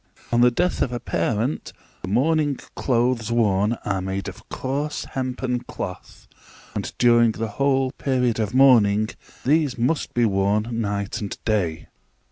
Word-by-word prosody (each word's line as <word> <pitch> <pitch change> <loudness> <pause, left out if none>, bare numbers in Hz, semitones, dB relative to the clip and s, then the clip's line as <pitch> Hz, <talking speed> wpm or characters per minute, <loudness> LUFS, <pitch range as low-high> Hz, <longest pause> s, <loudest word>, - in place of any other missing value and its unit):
On 120 0 +3
the 125 - +7
death 175 +9 0
of 125 - +1
a 120 - -3
parent, 115 +5 -2 0.3
the - - -6
mourning 145 - +2 0.2
clothes 120 -2 0
worn 105 -2 +2
are 95 -2 -1
made 95 +1 -3
of - - -10
coarse 140 +3 -3
hempen 130 -1 -2
cloth, 90 -6 -8 0.5
and - - -3
during 120 -2 +5
the 115 +1 -3
whole 135 -1 +2
period 125 -5 0
of 105 -2 -1
mourning 110 -6 +5 0.4
these 145 -2 +2
must 130 +7 -1
be 120 -1 +3
worn 100 +1 +1
night 105 -3 -2
and 100 - -5
day. 90 -8 0
120 Hz, 145 wpm, -23 LUFS, 105-130 Hz, 0.5 s, the